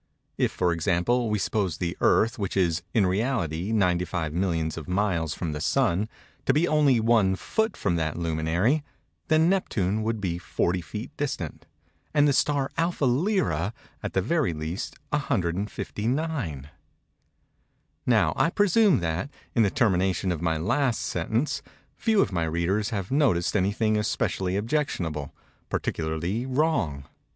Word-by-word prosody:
If, -, -, +2 dB
for 90 Hz, -2 st, +1 dB
example, 90 Hz, +9 st, +1 dB
we 105 Hz, -, +1 dB
suppose 95 Hz, -4 st, -1 dB
the 85 Hz, 0 st, -2 dB
Earth, 115 Hz, +1 st, +3 dB
which 100 Hz, -1 st, -2 dB
is, 85 Hz, -3 st, +2 dB
in 105 Hz, -4 st, +3 dB
reality, 95 Hz, -, -1 dB
95 90 Hz, -5 st, 0 dB
millions 80 Hz, -3 st, 0 dB
of 80 Hz, -3 st, -7 dB
miles 90 Hz, -5 st, 0 dB
from 85 Hz, -3 st, -3 dB
the 75 Hz, 0 st, -4 dB
Sun, 90 Hz, +7 st, +1 dB, 0.4 s
to 135 Hz, -, +5 dB
be 155 Hz, +5 st, +3 dB
only 145 Hz, -5 st, +4 dB
one 110 Hz, -4 st, +3 dB
foot 220 Hz, -, -1 dB
from 85 Hz, -4 st, 0 dB
that 80 Hz, -1 st, -1 dB
luminary; 85 Hz, -, +1 dB, 0.4 s
then 160 Hz, +1 st, +4 dB
Neptune 110 Hz, -, +1 dB
would 110 Hz, 0 st, -1 dB
be 90 Hz, -4 st, -2 dB
40 90 Hz, 0 st, -1 dB
feet 105 Hz, -, -7 dB
distant; 135 Hz, -, -4 dB, 0.5 s
and 145 Hz, 0 st, +5 dB
the 145 Hz, -, +3 dB
star 140 Hz, -1 st, +1 dB
Alpha 165 Hz, -3 st, +1 dB
Lyræ, 125 Hz, -, +1 dB, 0.3 s
at -, -, -4 dB
the 95 Hz, -, +1 dB
very 155 Hz, -, +1 dB
least, 80 Hz, +9 st, -4 dB
159. 105 Hz, -, -2 dB, 1.4 s
Now -, -, +4 dB
I -, -, +3 dB
presume 205 Hz, -, +4 dB
that, 85 Hz, -, -2 dB, 0.2 s
in 115 Hz, -, +3 dB
the 105 Hz, -, +4 dB
termination 95 Hz, -3 st, +1 dB
of 85 Hz, -2 st, -3 dB
my 80 Hz, -2 st, +1 dB
last 120 Hz, -, +1 dB
sentence, 120 Hz, +7 st, -1 dB, 0.3 s
few 220 Hz, -3 st, +2 dB
of -, -, 0 dB
my 85 Hz, -3 st, 0 dB
readers 85 Hz, +7 st, 0 dB
have 100 Hz, -4 st, -4 dB
noticed 130 Hz, -, +2 dB
anything 105 Hz, +2 st, +2 dB
especially 95 Hz, -2 st, -1 dB
objectionable—particularly 85 Hz, -, -3 dB
wrong. 130 Hz, -, 0 dB
100 Hz, 140 wpm, -26 LUFS, 85-130 Hz, 1.4 s, to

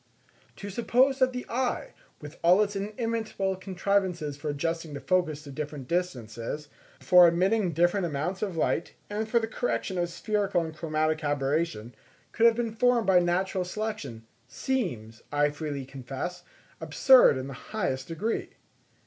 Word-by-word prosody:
_ -, -, -37 dB
To 205 Hz, 0 st, -7 dB
suppose 255 Hz, +5 st, +2 dB
that 260 Hz, -1 st, +4 dB
the 250 Hz, 0 st, -5 dB
eye 260 Hz, -, -2 dB, 0.3 s
with 150 Hz, 0 st, -11 dB
all 180 Hz, +5 st, +6 dB
its 205 Hz, 0 st, -4 dB
inimitable 215 Hz, -1 st, -2 dB
contrivances 185 Hz, -4 st, -1 dB
for 145 Hz, +2 st, -5 dB
adjusting 165 Hz, +1 st, -3 dB
the -, -, -5 dB
focus 165 Hz, -5 st, 0 dB
to 140 Hz, -, -10 dB
different 145 Hz, -2 st, -6 dB
distances, 145 Hz, -4 st, -3 dB, 0.3 s
for 180 Hz, -1 st, +7 dB
admitting 185 Hz, +3 st, +2 dB
different 175 Hz, +3 st, +2 dB
amounts 160 Hz, +5 st, -3 dB
of 195 Hz, -6 st, -3 dB
light, 165 Hz, -, 0 dB, 0.2 s
and 215 Hz, +1 st, -2 dB
for 235 Hz, -, +2 dB
the 225 Hz, -, -1 dB
correction 220 Hz, -5 st, -2 dB
of 175 Hz, -1 st, 0 dB
spherical 195 Hz, +1 st, 0 dB
and 160 Hz, -1 st, -8 dB
chromatic 155 Hz, 0 st, -1 dB
aberration, 145 Hz, -4 st, -1 dB, 0.4 s
could 230 Hz, -, +5 dB
have 230 Hz, -, +4 dB
been 230 Hz, -2 st, -2 dB
formed 240 Hz, 0 st, +3 dB
by 190 Hz, -2 st, +5 dB
natural 180 Hz, +2 st, 0 dB
selection, 180 Hz, -, -5 dB, 0.2 s
seems, 125 Hz, -, -3 dB
I 145 Hz, 0 st, +2 dB
freely 145 Hz, -2 st, -5 dB
confess, 135 Hz, +7 st, -6 dB, 0.4 s
absurd 260 Hz, -, +6 dB
in 130 Hz, -, -4 dB
the 135 Hz, -, -7 dB
highest 135 Hz, -, -3 dB
degree. 170 Hz, +8 st, -3 dB
175 Hz, 155 wpm, -28 LUFS, 145-210 Hz, 0.4 s, for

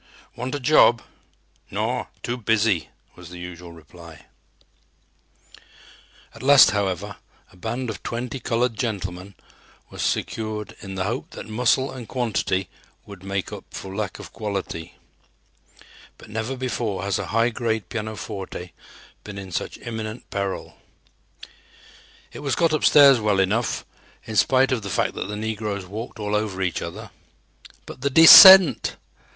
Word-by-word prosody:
"Want 125 Hz, +3 st, -4 dB
a -, -, -3 dB
job?" 125 Hz, -4 st, +4 dB, 0.7 s
"Naw, 115 Hz, +5 st, -2 dB, 0.2 s
too 120 Hz, -, -2 dB
busy," 110 Hz, -5 st, 0 dB, 0.3 s
was 90 Hz, -1 st, -13 dB
the 90 Hz, -, -10 dB
usual 90 Hz, -1 st, -9 dB
reply. 85 Hz, -1 st, -15 dB, 2.1 s
At -, -, -13 dB
last, 135 Hz, -2 st, +7 dB
however, 100 Hz, -1 st, -3 dB, 0.3 s
a -, -, -20 dB
band 115 Hz, +7 st, -4 dB
of 105 Hz, -, -9 dB
twenty 125 Hz, +3 st, -5 dB
"colored 120 Hz, -1 st, -1 dB
gentlemen" 100 Hz, -4 st, -5 dB, 0.6 s
was -, -, -7 dB
secured 110 Hz, -1 st, -3 dB
in 95 Hz, -1 st, -8 dB
the 95 Hz, -, -2 dB
hope 115 Hz, +6 st, -4 dB
that -, -, -8 dB
muscle 125 Hz, +4 st, +1 dB
and 125 Hz, -4 st, -9 dB
quantity 105 Hz, -6 st, -2 dB, 0.4 s
would 100 Hz, -3 st, -12 dB
make 95 Hz, -1 st, -4 dB
up -, -, -8 dB
for 95 Hz, 0 st, -8 dB
lack 105 Hz, -2 st, -4 dB
of -, -, -12 dB
quality. 100 Hz, -6 st, -5 dB, 1.2 s
But 110 Hz, -, -15 dB
never 110 Hz, +5 st, -4 dB
before 110 Hz, -6 st, -3 dB
has 100 Hz, +1 st, -1 dB
a 100 Hz, -, -5 dB
high 115 Hz, +1 st, +1 dB
grade 110 Hz, -4 st, -2 dB
pianoforte 105 Hz, -4 st, -6 dB, 0.5 s
been 105 Hz, -1 st, -9 dB
in 95 Hz, -2 st, -8 dB
such -, -, -4 dB
imminent 110 Hz, 0 st, -7 dB
peril. 100 Hz, -1 st, -4 dB, 1.6 s
It -, -, -9 dB
was 140 Hz, -2 st, -2 dB
got 165 Hz, -2 st, +1 dB
upstairs 140 Hz, -4 st, +6 dB
well 105 Hz, -2 st, +1 dB
enough, 105 Hz, +5 st, 0 dB, 0.4 s
in 110 Hz, -, -7 dB
spite 130 Hz, +4 st, +3 dB
of 125 Hz, -4 st, 0 dB
the 100 Hz, -, -6 dB
fact -, -, -1 dB
that -, -, -5 dB
the 105 Hz, -, -5 dB
negroes 105 Hz, -2 st, -4 dB
walked 110 Hz, +5 st, -8 dB
all 105 Hz, 0 st, -3 dB
over 105 Hz, -3 st, -1 dB
each 90 Hz, -, -2 dB
other. -, -, -8 dB, 0.7 s
But 125 Hz, -, -11 dB
the 140 Hz, -, 0 dB
descent! 165 Hz, -, +9 dB
110 Hz, 145 wpm, -23 LUFS, 95-120 Hz, 2.1 s, descent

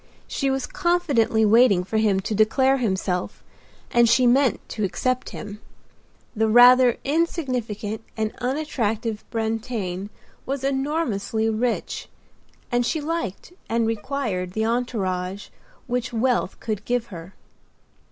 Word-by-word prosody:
She 275 Hz, -, -1 dB
was 270 Hz, -1 st, -1 dB
confidently 345 Hz, -12 st, +1 dB
waiting 215 Hz, -4 st, +5 dB
for 220 Hz, +4 st, -2 dB
him 205 Hz, -3 st, +2 dB
to 215 Hz, -, -3 dB
declare 260 Hz, +6 st, +3 dB
himself 190 Hz, -6 st, -2 dB, 0.5 s
and 235 Hz, -1 st, +4 dB
she 250 Hz, +2 st, +4 dB
meant 250 Hz, -2 st, +3 dB
to 215 Hz, -, -3 dB
accept 250 Hz, +7 st, -1 dB
him. 210 Hz, 0 st, -8 dB, 0.8 s
The 220 Hz, +1 st, +2 dB
rather 245 Hz, +2 st, +7 dB
insignificant 255 Hz, -, -2 dB, 0.2 s
and 220 Hz, -1 st, -1 dB
unattractive 235 Hz, -5 st, -2 dB
Brantain 220 Hz, -4 st, -3 dB, 0.3 s
was 270 Hz, 0 st, -4 dB
enormously 265 Hz, -6 st, -1 dB
rich; 230 Hz, +2 st, -2 dB, 0.6 s
and 245 Hz, 0 st, +2 dB
she 315 Hz, +6 st, -1 dB
liked 330 Hz, -, -4 dB, 0.2 s
and 230 Hz, 0 st, +1 dB
required 220 Hz, -5 st, -2 dB
the 220 Hz, +2 st, 0 dB
entourage 200 Hz, -5 st, -2 dB, 0.4 s
which 250 Hz, 0 st, -2 dB
wealth 240 Hz, -3 st, 0 dB
could 215 Hz, -2 st, -4 dB
give 245 Hz, 0 st, -1 dB
her. 170 Hz, +2 st, -10 dB
230 Hz, 120 wpm, -23 LUFS, 210-260 Hz, 0.8 s, rather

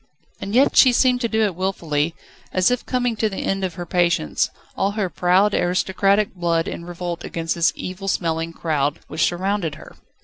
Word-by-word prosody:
And 200 Hz, +3 st, -4 dB
yet 270 Hz, +3 st, +4 dB
she 255 Hz, -2 st, +7 dB
seemed 250 Hz, 0 st, +3 dB
to 235 Hz, -, +1 dB
do 220 Hz, -1 st, +1 dB
it 205 Hz, -3 st, +1 dB
wilfully, 165 Hz, -4 st, -1 dB, 0.4 s
as 185 Hz, +4 st, +3 dB
if 250 Hz, -, -2 dB
coming 245 Hz, -2 st, 0 dB
to 220 Hz, -, +1 dB
the 195 Hz, -, -5 dB
end 195 Hz, 0 st, -1 dB
of 180 Hz, -3 st, -2 dB
her 175 Hz, -, -5 dB
patience, 170 Hz, -, +1 dB, 0.3 s
all 200 Hz, +1 st, 0 dB
her 200 Hz, -4 st, -2 dB
proud, 185 Hz, +5 st, +3 dB
aristocratic 195 Hz, +3 st, +1 dB
blood 170 Hz, -2 st, 0 dB
in 170 Hz, -, -6 dB
revolt 175 Hz, -1 st, -5 dB
against 165 Hz, -1 st, -3 dB
this 170 Hz, -1 st, +2 dB
evil 185 Hz, +2 st, -6 dB
smelling 165 Hz, -3 st, -1 dB
crowd 150 Hz, -4 st, -1 dB
which 155 Hz, +1 st, -4 dB
surrounded 180 Hz, -3 st, 0 dB
her. 155 Hz, -, -13 dB
180 Hz, 190 wpm, -21 LUFS, 165-205 Hz, 0.4 s, she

